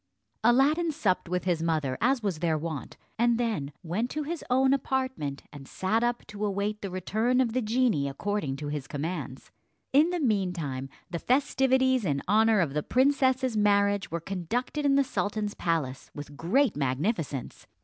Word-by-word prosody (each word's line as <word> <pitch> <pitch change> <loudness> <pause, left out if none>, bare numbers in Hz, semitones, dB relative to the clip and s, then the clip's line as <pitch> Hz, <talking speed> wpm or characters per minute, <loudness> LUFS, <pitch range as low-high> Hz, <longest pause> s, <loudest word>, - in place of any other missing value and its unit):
Aladdin 285 +8 +4
supped 185 - 0
with 180 0 -1
his 175 -3 0
mother 155 -5 0
as 255 0 +2
was 190 -6 -1
their 165 -2 +1
wont, 155 -3 -5 0.2
and 235 0 +3
then 215 -13 -1
went 195 +9 -2
to 305 +2 -3
his 330 +3 -4
own 265 +2 +4
apartment, 260 - -2
and 140 -2 -10
sat 220 +5 0
up 240 0 -1
to 210 0 -7
await 205 +1 -1
the 200 - -4
return 220 +7 0
of 240 -4 +1
the 255 - +1
genie, 220 - +1
according 155 -1 -2
to 145 +1 -5
his 145 -2 -4
commands. 145 -3 -5 0.4
In 300 +5 +5
the 355 0 -1
mean 205 - +1
time 135 -6 -4 0.2
the 170 - -2
festivities 260 - +2
in 140 -6 -1
honour 220 0 +4
of 150 -5 -1
the 150 - 0
princess's 260 - +2
marriage 200 -1 +2
were 170 - -2
conducted 225 - -2
in 275 - +4
the 280 - +5
sultan's 210 -4 -2
palace 145 -6 -2
with 145 0 -8
great 210 - +2
magnificence. 145 - -2
205 Hz, 170 wpm, -28 LUFS, 160-255 Hz, 0.4 s, In